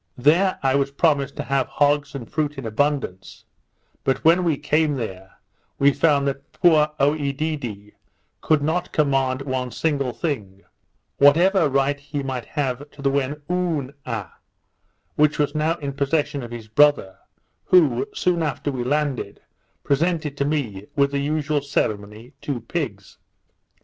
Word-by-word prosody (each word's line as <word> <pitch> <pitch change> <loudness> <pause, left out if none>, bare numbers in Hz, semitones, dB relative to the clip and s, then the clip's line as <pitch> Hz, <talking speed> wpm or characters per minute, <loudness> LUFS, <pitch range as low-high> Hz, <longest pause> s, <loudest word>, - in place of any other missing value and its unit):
There 165 +9 +3
I 135 -1 +3
was 140 0 +1
promised 140 -2 +1
to - - -4
have 135 -1 0
hogs 145 0 +1
and 120 -5 -6
fruit 150 -2 -2
in 135 - -6
abundance; 115 -5 -2 0.6
but 135 - -1
when 170 +3 +5
we 165 -5 +1
came 150 +1 +1
there, 95 -6 -6 0.4
we 140 +1 +5
found 140 -1 +2
that 140 0 -5
poor 155 -3 +4
Oedidee 140 -7 -1 0.5
could 155 -2 +2
not 175 +4 -1
command 135 -3 +1
one 130 -2 -2
single 140 -3 -1
thing, 110 - -4 0.6
whatever 165 +4 +5
right 140 +1 +1
he 145 0 -5
might 130 -3 -4
have 145 -1 -3
to 145 - -13
the 135 - +2
Whenooa, 140 - -3 0.9
which 150 0 +3
was 145 -1 0
now 155 +2 +1
in 140 -4 -5
possession 145 +1 0
of 120 - -7
his 115 -2 -8
brother, 145 -5 +3 0.5
who, 150 -10 +4
soon 175 -2 0
after 145 -1 -2
we 125 -2 -3
landed, 140 -5 -1 0.4
presented 155 0 0
to 140 - 0
me, 115 -10 -2
with 140 -1 +2
the 140 - -1
usual 150 0 0
ceremony, 110 -4 -3
two 135 -5 -3
pigs. 115 - -5
140 Hz, 145 wpm, -22 LUFS, 130-150 Hz, 0.9 s, when